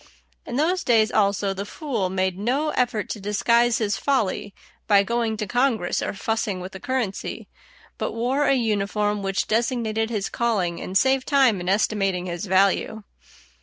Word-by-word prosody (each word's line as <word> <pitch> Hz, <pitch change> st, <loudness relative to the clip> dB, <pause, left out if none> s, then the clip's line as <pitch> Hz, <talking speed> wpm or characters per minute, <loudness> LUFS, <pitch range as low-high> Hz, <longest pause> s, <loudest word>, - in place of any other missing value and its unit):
In 240 Hz, -, -4 dB
those 345 Hz, +7 st, +1 dB
days 220 Hz, -3 st, +3 dB
also, 200 Hz, -1 st, +1 dB
the 195 Hz, +1 st, -4 dB
fool 225 Hz, -, -3 dB
made 185 Hz, -1 st, 0 dB
no 255 Hz, +10 st, 0 dB
effort 245 Hz, -6 st, 0 dB
to 215 Hz, -, -4 dB
disguise 235 Hz, +4 st, +2 dB
his 205 Hz, -3 st, -1 dB
folly 215 Hz, -7 st, 0 dB, 0.4 s
by 200 Hz, -1 st, +5 dB
going 230 Hz, 0 st, -1 dB
to 210 Hz, -, -2 dB
Congress 240 Hz, -4 st, 0 dB
or -, -, -2 dB
fussing 210 Hz, -2 st, -2 dB
with 185 Hz, +1 st, -7 dB
the 190 Hz, -, -9 dB
currency, 245 Hz, -4 st, -3 dB, 0.5 s
but -, -, -2 dB
wore 255 Hz, +5 st, 0 dB
a 275 Hz, -, +4 dB
uniform 210 Hz, -3 st, 0 dB
which 195 Hz, 0 st, -1 dB
designated 225 Hz, -1 st, 0 dB
his 210 Hz, -4 st, -2 dB
calling 200 Hz, -8 st, -1 dB
and 190 Hz, -, 0 dB
saved 265 Hz, +3 st, +2 dB
time 265 Hz, -9 st, +3 dB
in 180 Hz, -, -3 dB
estimating 195 Hz, -2 st, +1 dB
his 175 Hz, +2 st, -5 dB
value. 195 Hz, +3 st, +2 dB
215 Hz, 165 wpm, -23 LUFS, 195-240 Hz, 0.5 s, by